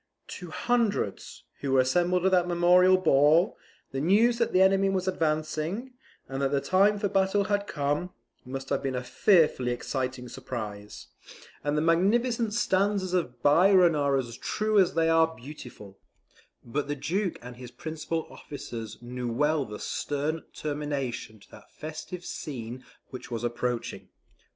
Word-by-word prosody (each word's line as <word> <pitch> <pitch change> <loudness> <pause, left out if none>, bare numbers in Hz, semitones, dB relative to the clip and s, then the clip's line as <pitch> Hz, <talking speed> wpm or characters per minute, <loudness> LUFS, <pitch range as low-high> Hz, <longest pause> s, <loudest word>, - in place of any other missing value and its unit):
To 180 -2 -8
hundreds, 220 - -1 0.2
who 135 -2 -2
were 135 - +5
assembled 175 +7 +1
at 190 - +4
that 180 -1 +3
memorable 180 +2 +5
ball, 155 +1 +4 0.4
the 135 - -3
news 225 +8 +3
that 235 - +1
the 185 - +3
enemy 195 0 +3
was 190 -1 -1
advancing, 160 +7 -1 0.3
and 135 +1 -4
that 135 - +2
the 140 0 +1
time 195 +8 +3
for 205 - 0
battle 195 +1 +2
had 205 0 -1
come, 145 +5 -1 0.3
must 135 +1 -6
have - - 0
been 135 -2 -2
a 125 - -3
fearfully 155 -4 +3
exciting 130 0 -3
surprise, 110 -6 -7 0.5
and 145 +1 0
the 150 - +1
magnificent 220 +7 +2
stanzas 195 -4 +1
of 125 -9 -2
Byron 180 +3 +5
are 140 -2 +2
as 120 -3 -4
true 215 -1 +1
as 185 -4 +3
they 165 0 +3
are 165 0 +3
beautiful; 125 -7 -11 0.7
but 140 +5 -2
the 145 - -2
Duke 180 +6 -2
and 125 0 -9
his 125 -1 -9
principal 160 +4 -4
officers 115 -6 -8
knew 125 0 -4
well 150 +3 +1
the 105 -1 -7
stern 150 +3 -2
termination 145 -7 -4
to - - -20
that - - -15
festive 165 +3 -8
scene 125 -3 -6 0.3
which 130 - -8
was 115 -1 -4
approaching. 120 0 -3
155 Hz, 155 wpm, -27 LUFS, 130-185 Hz, 0.7 s, were